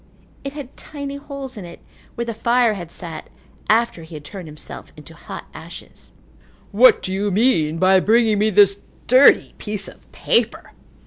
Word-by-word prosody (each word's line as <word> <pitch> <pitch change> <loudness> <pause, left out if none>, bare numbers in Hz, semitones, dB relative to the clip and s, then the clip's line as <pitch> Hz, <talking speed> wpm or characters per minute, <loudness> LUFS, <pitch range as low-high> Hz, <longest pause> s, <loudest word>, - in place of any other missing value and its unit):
It 275 0 -5
had 285 -3 -9
tiny 280 -2 -7
holes 275 -3 -8
in 205 - -7
it 170 -1 -11 0.4
where 235 - -3
the 230 - -4
fire 235 +1 +2
had 175 -4 -8
sat 165 -3 -7 0.4
after 225 -5 +2
he 160 0 -11
had 150 -1 -10
turned 185 0 -9
himself 150 - -9
into - - -13
hot - - -9
ashes. - - -12 0.6
"What 245 +5 +5
do 185 - -3
you 200 +2 -1
mean 180 -7 +2
by 190 +2 +5
bringing 220 +1 +3
me 215 +1 +3
this 200 -1 +4 0.3
dirty 260 +3 +5
piece 210 -1 -5
of - - -16
paper?" - - 0
210 Hz, 170 wpm, -20 LUFS, 180-245 Hz, 0.6 s, What